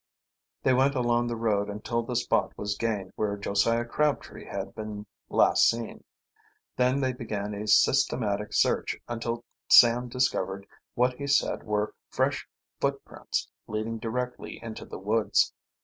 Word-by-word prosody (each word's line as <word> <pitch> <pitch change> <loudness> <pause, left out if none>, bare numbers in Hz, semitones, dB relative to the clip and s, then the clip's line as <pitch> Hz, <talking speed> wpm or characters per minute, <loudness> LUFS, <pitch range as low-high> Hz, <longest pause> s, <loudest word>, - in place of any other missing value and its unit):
They 130 - +4
went 135 +2 +3
along 120 -1 +2
the 120 - -2
road 105 -3 0
until 105 +3 -2
the 120 +1 -5
spot 120 - +1
was 100 -1 -2
gained 100 -4 -2
where 105 -1 -1
Josiah 100 +4 +1
Crabtree 150 +4 -1
had - - -5
been 105 -1 -6 0.2
last - - +5
seen. 115 -1 -4 0.7
Then 125 +2 +2
they 130 -1 +1
began 105 -4 -4
a 105 +1 -5
systematic 105 0 +3
search - - +1
until 115 0 -3 0.2
Sam 120 +1 +7
discovered 100 -6 -1 0.3
what 125 +1 +3
he 140 +3 -6
said 140 - +2
were 105 0 -1 0.2
fresh - - 0 0.3
footprints - - -2 0.2
leading 110 +1 -3
directly 125 +2 -4
into 115 -1 -7
the - - -8
woods. 105 +3 +2
115 Hz, 140 wpm, -28 LUFS, 105-125 Hz, 0.7 s, Sam